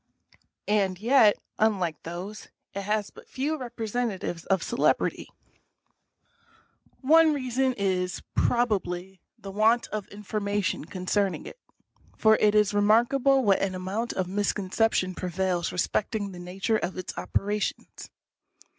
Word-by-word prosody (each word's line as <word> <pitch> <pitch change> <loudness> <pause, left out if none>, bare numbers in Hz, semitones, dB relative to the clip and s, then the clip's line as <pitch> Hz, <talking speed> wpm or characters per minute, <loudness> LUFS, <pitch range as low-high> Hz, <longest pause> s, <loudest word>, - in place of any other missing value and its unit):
And 195 -3 +1
yet, 225 -2 +5 0.2
unlike 190 -8 +1
those, 180 +6 -7 0.3
it 200 - -3
has 210 +1 -1
but - - -15
few 290 +4 -2
representatives 230 - -3
of 190 -3 +1
celebrity. - - 0 1.7
One 315 +2 +5
reason 260 -1 0
is, 185 -3 -1
probably, 190 -6 0 0.2
the 195 - -9
want 220 +4 +3
of 215 -2 -4
information 205 -4 -2
concerning 190 +2 -1
it, - - -10 0.6
for 220 0 +5
it 210 0 +3
is 210 -1 +3
remarkable 240 +6 +3
what 200 -3 +3
an 190 -1 -1
amount 195 +6 -3
of 185 - -1
misconcep 205 +3 0
tion 185 0 0
prevails 180 -1 -1
respecting 200 +3 -1
the 180 - -10
nature 190 +5 -1
of 185 -2 -4
its 185 +2 -6
operations. 205 +1 -3
205 Hz, 120 wpm, -27 LUFS, 185-225 Hz, 1.7 s, yet